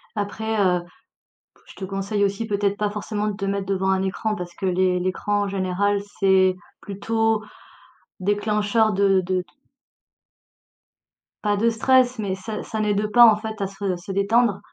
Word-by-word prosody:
Après, 220 Hz, +2 st, -3 dB
heu, 180 Hz, -3 st, +2 dB, 0.6 s
p -, -, -33 dB
je -, -, -14 dB
te 190 Hz, -, -7 dB
conseille 195 Hz, +2 st, -1 dB
aussi 200 Hz, +3 st, -1 dB
peut-être 200 Hz, -1 st, 0 dB
pas 210 Hz, 0 st, -1 dB
forcément 210 Hz, 0 st, -3 dB
te 195 Hz, -, -5 dB
mettre 195 Hz, 0 st, -2 dB
devant 190 Hz, 0 st, 0 dB
un 190 Hz, 0 st, +1 dB
écran 210 Hz, +3 st, -2 dB
parce 175 Hz, -2 st, -7 dB
que 190 Hz, -, -4 dB
l'é 185 Hz, 0 st, +2 dB
l'écran 205 Hz, +3 st, -1 dB
en 200 Hz, -, -2 dB
général 195 Hz, +1 st, 0 dB, 0.2 s
c'est 190 Hz, -1 st, +4 dB, 0.3 s
plutôt 225 Hz, +2 st, -1 dB, 0.8 s
déclencheur 210 Hz, +2 st, +1 dB
de 195 Hz, -1 st, +3 dB
de 185 Hz, 0 st, -1 dB
d -, -, -8 dB, 2.0 s
pas 205 Hz, -1 st, +1 dB
de 230 Hz, +3 st, +2 dB
stress, 250 Hz, +2 st, +3 dB
mais 200 Hz, -3 st, -2 dB
ça 210 Hz, +3 st, -6 dB
ça 220 Hz, -, -4 dB
n'aide 210 Hz, 0 st, 0 dB
pas, 240 Hz, 0 st, +8 dB
en 220 Hz, -3 st, +7 dB
fait, 220 Hz, 0 st, -7 dB
à 195 Hz, -, 0 dB
se 195 Hz, -2 st, -3 dB
se 175 Hz, +3 st, -11 dB
détendre. 200 Hz, +2 st, +2 dB
200 Hz, 165 wpm, -23 LUFS, 190-215 Hz, 2.0 s, pas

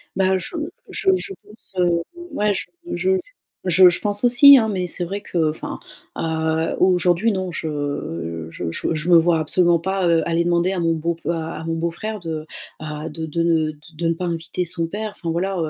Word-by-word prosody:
Bah, 190 Hz, 0 st, +2 dB
je 185 Hz, -, -6 dB, 0.3 s
je 385 Hz, -, 0 dB
je 390 Hz, +1 st, -4 dB
pense, 210 Hz, -2 st, -16 dB
heu, 175 Hz, -2 st, +2 dB, 0.3 s
ouais 210 Hz, 0 st, +1 dB
je -, -, -3 dB, 0.3 s
je 185 Hz, +2 st, +1 dB
je -, -, 0 dB, 0.5 s
je 180 Hz, 0 st, +7 dB
je 175 Hz, -, -2 dB
pense 205 Hz, 0 st, -1 dB
aussi, 260 Hz, +4 st, +9 dB
hein! 225 Hz, -3 st, +2 dB
Mais 185 Hz, -3 st, -2 dB
c'est 175 Hz, -, -3 dB
vrai 195 Hz, +4 st, -4 dB
que, 165 Hz, -5 st, 0 dB
enfin, 155 Hz, -, -6 dB, 0.4 s
heu, 160 Hz, 0 st, -1 dB
aujourd'hui 180 Hz, +3 st, +3 dB
non, 185 Hz, -2 st, -2 dB
je 145 Hz, -, -4 dB
je 85 Hz, 0 st, -5 dB
je 165 Hz, -, -1 dB
je 155 Hz, +2 st, -2 dB
me 170 Hz, -, +9 dB
vois 165 Hz, 0 st, +3 dB
absolument 170 Hz, +2 st, +3 dB
pas, 190 Hz, +1 st, 0 dB
heu, 165 Hz, -1 st, +3 dB
aller 170 Hz, 0 st, +1 dB
demander 175 Hz, +1 st, +2 dB
à 190 Hz, -, -2 dB
mon 165 Hz, -1 st, +2 dB
beau 165 Hz, +2 st, -1 dB
f 165 Hz, -, -12 dB
à 165 Hz, -1 st, -2 dB
à -, -, -7 dB
mon 165 Hz, 0 st, -1 dB
beau 165 Hz, +1 st, -1 dB
frère 215 Hz, +5 st, -5 dB
de, 160 Hz, -3 st, -5 dB, 0.3 s
heu, 155 Hz, +1 st, -5 dB
de 160 Hz, +1 st, -5 dB
de 165 Hz, +2 st, -1 dB
ne 160 Hz, -2 st, +2 dB
de 150 Hz, -, -17 dB, 0.2 s
de 170 Hz, +1 st, -1 dB
ne 165 Hz, -, +2 dB
pas 180 Hz, +2 st, -4 dB
inviter 170 Hz, +1 st, -3 dB
son 165 Hz, -1 st, -2 dB
père. 210 Hz, +4 st, -5 dB
Enfin 170 Hz, -, -5 dB
voilà, 190 Hz, +4 st, -1 dB
170 Hz, 220 wpm, -21 LUFS, 160-190 Hz, 0.5 s, aussi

